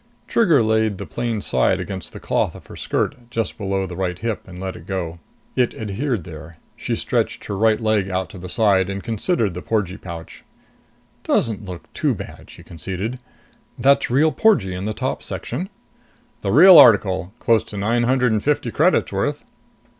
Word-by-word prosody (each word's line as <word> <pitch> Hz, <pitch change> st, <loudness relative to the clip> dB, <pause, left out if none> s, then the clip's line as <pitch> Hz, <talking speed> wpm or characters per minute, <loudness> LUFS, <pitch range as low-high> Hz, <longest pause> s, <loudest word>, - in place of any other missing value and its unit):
Trigger 170 Hz, -, +4 dB
laid 110 Hz, -2 st, +1 dB
the -, -, -6 dB
plain 115 Hz, -3 st, -3 dB
side 65 Hz, -, +2 dB
against 95 Hz, -3 st, -6 dB
the -, -, -9 dB
cloth -, -, -1 dB
of -, -, -12 dB
her -, -, -11 dB
skirt, 125 Hz, -4 st, -3 dB
just 115 Hz, -2 st, -2 dB
below 95 Hz, -2 st, -2 dB
the 90 Hz, -1 st, -7 dB
right 90 Hz, -1 st, -2 dB
hip, 115 Hz, +1 st, -4 dB
and 90 Hz, -1 st, -10 dB
let 95 Hz, 0 st, -6 dB
go. 85 Hz, -4 st, -4 dB, 0.4 s
It 125 Hz, -2 st, +1 dB
adhered 110 Hz, -, -2 dB
there. 80 Hz, 0 st, -10 dB, 0.2 s
She -, -, -3 dB
stretched -, -, -1 dB
her 100 Hz, -, -4 dB
right 110 Hz, +1 st, +3 dB
leg 110 Hz, -4 st, +1 dB
out 95 Hz, -1 st, -1 dB
to 95 Hz, -, -10 dB
the 90 Hz, +1 st, -8 dB
side 95 Hz, -1 st, +3 dB
and 100 Hz, 0 st, -4 dB
considered 115 Hz, -, 0 dB
the 90 Hz, -, -6 dB
porgee 100 Hz, -3 st, -1 dB
pouch. 85 Hz, -2 st, -9 dB, 0.8 s
"Doesn't 110 Hz, -3 st, 0 dB
look 90 Hz, -2 st, -7 dB
too -, -, 0 dB
bad," -, -, -10 dB
she -, -, -13 dB
conceded. 95 Hz, +8 st, -5 dB, 0.6 s
"That's 140 Hz, +3 st, +3 dB
real 145 Hz, +6 st, +3 dB
porgee 135 Hz, -, +2 dB
in 90 Hz, +2 st, -4 dB
the 110 Hz, 0 st, -3 dB
top -, -, -2 dB
section?" 185 Hz, +4 st, -5 dB, 0.7 s
"The 100 Hz, -, -1 dB
real 175 Hz, -, +9 dB
article. 95 Hz, -5 st, +5 dB
Close 115 Hz, -1 st, +2 dB
to 105 Hz, -, -8 dB
nine 115 Hz, +4 st, +1 dB
hundred 125 Hz, 0 st, +2 dB
and 110 Hz, -1 st, 0 dB
fifty 150 Hz, 0 st, 0 dB
credits -, -, +2 dB
worth." -, -, -2 dB
105 Hz, 180 wpm, -21 LUFS, 95-120 Hz, 0.8 s, real